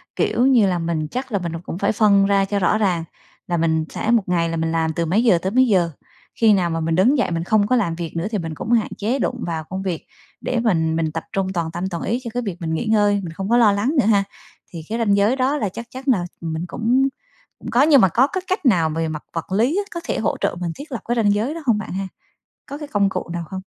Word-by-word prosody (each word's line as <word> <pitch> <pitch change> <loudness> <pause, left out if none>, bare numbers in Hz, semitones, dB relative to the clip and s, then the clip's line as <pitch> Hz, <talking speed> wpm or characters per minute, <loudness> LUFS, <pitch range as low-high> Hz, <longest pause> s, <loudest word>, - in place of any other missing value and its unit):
Kiểu 245 - +1
như 245 -6 +5
là 180 -2 0
mình 165 -2 -2
chắc 255 0 -4
là 200 - 0
mình 170 -2 -4
là 165 - -4
cũng 175 - -6
phải 200 +1 +1
phân 200 -2 +4
ra 195 0 +3
cho 200 +1 -1
rõ 190 +3 +2
ràng 185 -6 +1 0.4
là 175 - 0
mình 160 -1 +1
sẽ 225 - -2
1 235 -3 +3
ngày 170 -2 +1
là 165 - -2
mình 160 0 -1
làm 160 -1 0
từ 170 - -1
mấy 195 +8 +2
giờ 215 -8 +5
tới 185 +3 -3
mấy 255 +3 +4
giờ, 180 -6 +2 0.4
khi 225 -2 +4
nào 180 -3 +1
mà 165 0 -2
mình 165 0 0
đứng 240 - +4
dậy 245 - 0
mình 165 0 -1
không 205 +2 +2
có 255 - +2
làm 200 -9 0
việc 170 -1 -6
nữa 170 +4 -1
thì 210 - 0
mình 165 -3 -5
cũng 225 - -5
hạn 230 -3 +2
chế 230 +7 -1
đụng 250 -2 -2
vào 160 -2 -3
công 190 +5 -6
việc 180 -4 -4 0.3
để 250 - -1
mình 165 -9 +1
mình 160 -1 -1
tập 165 +1 -4
trung 195 -1 0
toàn 165 -3 -2
tâm 175 +3 -3
toàn 170 -3 -5
ý 235 +5 -1
cho 235 - -5
cái 245 0 -2
việc 195 -5 -4
mình 160 -1 -2
nghỉ 160 - -2
ngơi, 210 -2 +3
mình 165 -2 -6
không 195 +4 -5
có 240 - +4
lo 225 -4 +6
lắng 205 +9 0
nữa - - +3
ha? 205 -2 +4 0.5
Thì 165 -2 -7
cái 225 - -2
ranh 215 -4 +2
giới 205 +5 +3
đó 270 +3 +1
là 215 -8 -1
chắc 230 +5 -8
chắn 260 +1 -8
là 205 -10 +2 0.2
mình 160 0 -3
cũng 245 +7 +1 0.5
cũng - - -7
có, 245 - +4
nhưng 290 -4 +6
mà 190 - +5
có 250 +10 +3
cái 375 +5 -3
cách 375 -4 -2
nào 175 -10 +3
về 160 +1 -2
mặt 155 -1 -5
vật 165 +2 -5
lý 235 - +2
á 410 - +1
có 340 - -3
thể - - -2
hỗ - - -1
trợ - - 0
mình 170 -2 -2
thiết 285 +2 -10
lập 245 - -4
cái 240 - 0
ranh 210 -4 +3
giới 220 +8 -1
đó 330 - -7
hông 235 -5 +3
bạn 210 - -6
ha? 195 0 -3 0.6
Có 285 - -7
cái 295 -1 -7
công 200 -4 +1
cụ 190 - -5
nào 170 -1 -4
không? 190 0 -5
200 Hz, 295 wpm, -21 LUFS, 170-235 Hz, 0.6 s, lo